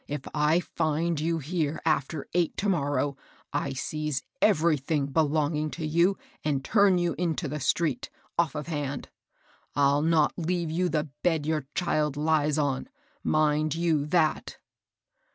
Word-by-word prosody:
If 145 -2 -4
I 150 +4 +3
find 160 -1 -1
you 165 +2 0
here 160 0 -2
after 155 -1 0
eight 175 -2 +1
to 205 - -1
mor 145 -6 +1
row, 140 +1 0 0.4
I 140 -1 -1
seize 150 0 -3 0.2
everything 155 -6 +2
belonging 150 +1 +1
to 165 - -3
you, 170 +5 +3 0.3
and 140 -3 -1
turn 200 -4 +4
you 175 -1 +1
into 170 -2 -1
the 150 +2 -4
street, 145 -1 0 0.3
off 165 -4 +1
of 150 -1 -3
hand. 145 -4 -4 0.7
I'll 140 0 +3
not 160 -1 +3
leave 170 -1 -1
you 180 +2 +1
the 155 -3 -1
bed 160 -4 +1
your 155 -3 -1
child 150 -5 0
lies 150 -1 +2
on, 145 - -1 0.2
— - - -38
mind 155 0 +2
you 160 -3 +1
that." 155 -1 +1
155 Hz, 155 wpm, -27 LUFS, 145-170 Hz, 0.7 s, turn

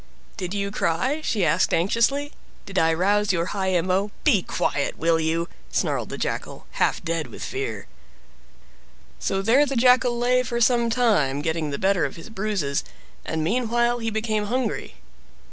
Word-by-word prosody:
"Did 185 +1 -4
you 200 0 -2
cry?" 250 - 0
she 205 - +1
asked 180 +3 +2
anxiously. 235 - +1 0.3
"Did 195 -2 -1
I 165 0 +3
rouse 200 +5 +2
your 170 -2 0
high 190 -2 0
emo—" 185 +4 0
"Be 240 -11 +4
quiet, 145 -4 -1
will 165 0 +2
you!" 165 +1 0 0.2
snarled - - -1
the - - -5
Jackal; - - -4 0.2
half - - +2
dead 165 -2 -2
with - - -9
fear!" 415 +1 -4 1.3
So 195 0 -1
there 245 +7 +5
the 275 - -3
Jackal 250 0 +4
lay 250 +1 +3
for 235 -1 -3
some 235 0 +3
time, 185 - +2
getting 160 -1 -1
the 140 - -3
better 190 -1 +2
of - - -2
his 165 +6 -11
bruises, 195 -10 -1 0.4
and 160 -1 -2
meanwhile 240 +4 +1
he 225 -1 -2
became 215 -1 -1
hungry. 240 +1 -2
205 Hz, 160 wpm, -24 LUFS, 170-240 Hz, 1.3 s, there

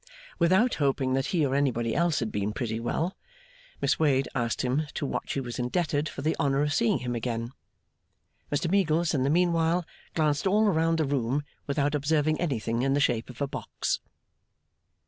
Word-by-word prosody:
Without 190 +8 +4
hoping 135 -2 +1
that 135 0 0
he 165 -5 +1
or 135 - -1
anybody 120 -5 +1
else 170 -4 +1
had 115 - -2
been 105 +1 -2
pretty 115 -3 -3
well, 160 +10 -2 0.7
Miss - - +2
Wade 140 -4 +3
asked 120 -3 -1
him 135 +5 0
to - - -2
what - - -3
she - - -1
was 120 -2 -5
indebted 145 +3 0
for 135 - -7
the 155 - +1
honour 140 0 +2
of 145 -1 0
seeing 115 - +2
him 125 -1 -3
again? 115 0 -3 1.0
Mr 145 +4 0
Meagles, 170 -3 +2
in 140 - +1
the 135 - +2
meanwhile, 170 +1 +2 0.3
glanced 150 +1 +1
all 210 +3 +4
round 165 -4 +2
the 160 - +1
room 135 0 0 0.2
without 145 +1 0
observing 150 +1 +1
anything 115 - -1
in 135 +1 +2
the - - +2
shape 120 -4 +1
of 125 +2 -10
a - - 0
box. - - -3
145 Hz, 185 wpm, -27 LUFS, 125-160 Hz, 1.0 s, Without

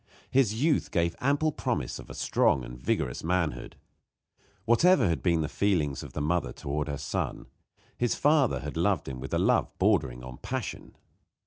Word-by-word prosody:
His 125 -6 +3
youth 145 +5 +1
gave 85 -2 0
ample 145 +4 +2
promise 120 - -2
of - - -11
a - - -8
strong 65 - +2
and - - -8
vigorous 60 0 -2
manhood. 85 -1 -1 0.9
Whatever 175 +11 +5
may 95 - +3
have 80 - -2
been 85 -3 +2
the 75 - -1
feelings 80 -8 0
of - - -10
the 75 - -3
mother 85 +4 0
toward 75 +1 -3
her 70 -1 -3
son, 70 -1 -3 0.5
his 120 -1 +1
father 140 - +3
had 75 +1 -6
loved 90 -1 +1
him 65 -1 -5
with 65 - -7
a - - +1
love - - +2
bordering 60 -2 +1
on 65 0 -9
passion. - - -5
85 Hz, 180 wpm, -28 LUFS, -, 0.9 s, Whatever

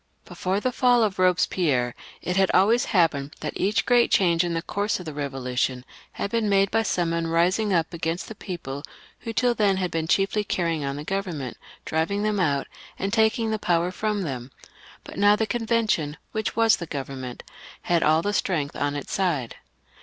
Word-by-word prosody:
Before 190 +2 -2
the 255 +4 -1
fall 245 -1 +4
of 205 -3 0
Bobespierre, 175 -8 +2 0.3
it 180 - -1
had 190 0 +3
always 225 +6 +4
happened 155 - +1
that 150 - -3
each 205 +3 +1
great 245 -1 +4
change 170 -3 +3
in 170 -1 -2
the 165 - -2
course 205 0 -1
of 180 - -8
the 155 - -5
Eevolution 130 -3 -2 0.3
had 200 - -4
been 230 -2 +1
made 195 0 +3
by 225 - +3
some 175 -5 0
one 170 0 -1
rising 180 +6 +2
up 165 -3 +1
against 165 +1 -3
the - - -7
people 165 -9 -6 0.4
who 235 - -8
had 225 - -5
till 245 +1 +3
then 205 -4 +2 0.2
been 160 -1 -2
chiefly 195 +4 +2
canying 170 -5 -1
on 140 0 -2
the 145 - -6
government, 170 - -3 0.3
driving 165 +6 0
them 210 -1 0
out, 145 -6 +1 0.3
and 195 +1 -3
taking 220 0 +2
the 220 - -1
power 175 -1 +1
&om 210 -2 0
them; 130 -5 -5 0.5
but - - -11
now 205 +1 +6
the 220 - 0
Convention, 220 -10 0
which 220 0 -2
was 225 -2 +4
the 170 - -6
Government, 135 -4 -6 0.4
had 170 -1 +2
aU 155 +2 +3
the 205 - -1
strength 160 -8 -1
on 145 0 -1
its 145 - -5
side. 165 -11 -1
180 Hz, 190 wpm, -25 LUFS, 155-210 Hz, 0.5 s, now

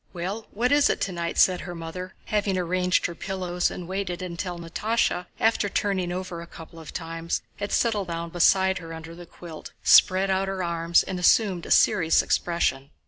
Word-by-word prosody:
"Well, 195 +5 -5
what 240 +5 0
is 290 0 +5
it - - 0
tonight?" 170 -3 -3
said 180 -1 +4
the 175 -2 -7
mother, 170 +3 -7
having 205 -3 0
arranged 180 +1 +1
her 170 - -2
pillows 180 -1 -2
and 175 - -7
waited 185 -1 -3
until 175 0 -5
Natásha, 180 +3 -1
after 220 -2 +2
turning 190 -3 -1
over 180 -1 -5
a 170 - -10
couple 165 0 -12
of 160 - -10
times, 165 -1 -4
had 205 0 -4
settled 210 -5 +1
down 170 0 -4
beside 190 +2 +3
her 165 -1 -8
under 165 +1 -9
the 175 0 -11
quilt, 165 -3 -11
spread 190 0 +5
out 190 +1 0
her 190 -1 -3
arms, 170 0 +2
and 185 - -5
assumed 185 -1 +3
a - - -9
serious 175 -7 +4
expression. 140 -6 0
180 Hz, 185 wpm, -25 LUFS, 170-195 Hz, -, is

